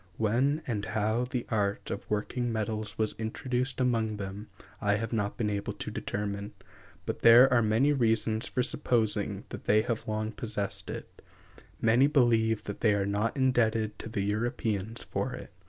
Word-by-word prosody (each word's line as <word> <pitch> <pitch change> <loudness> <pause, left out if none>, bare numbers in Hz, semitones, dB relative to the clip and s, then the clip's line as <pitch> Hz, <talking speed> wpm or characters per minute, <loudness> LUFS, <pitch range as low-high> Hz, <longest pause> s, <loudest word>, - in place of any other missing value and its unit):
When 130 +8 +1
and 105 -5 -2
how 110 +3 0
the 125 -1 -3
art 100 -2 -1
of 100 - -6
working 120 +3 -1
metals 110 -2 -3
was 110 -1 0
introduced 125 +3 -2
among 115 -4 +1
them 100 +1 -6 0.3
I 105 0 +2
have 115 +2 -3
not 105 -2 -1
been 105 -3 0
able 100 0 -3
to - - -6
determine; 100 0 -4 0.5
but - - -4
there 120 +3 +8
are 120 - +5
many 115 +7 +3
reasons 115 -3 +1
for 125 - 0
supposing 120 -5 0
that - - -8
they 110 +1 +4
have 115 -1 -3
long 110 0 -2
possessed 105 -3 -3
it; - - -8 0.6
many 120 +5 +4
believe 115 -6 +3
that 100 - -7
they 105 -3 +4
are 100 -1 0
not 105 +5 -1
indebted 115 -5 +1
to - - -7
the 105 - -2
Europeans 105 0 -1
for - - -3
it. - - -9
110 Hz, 170 wpm, -29 LUFS, 105-120 Hz, 0.6 s, there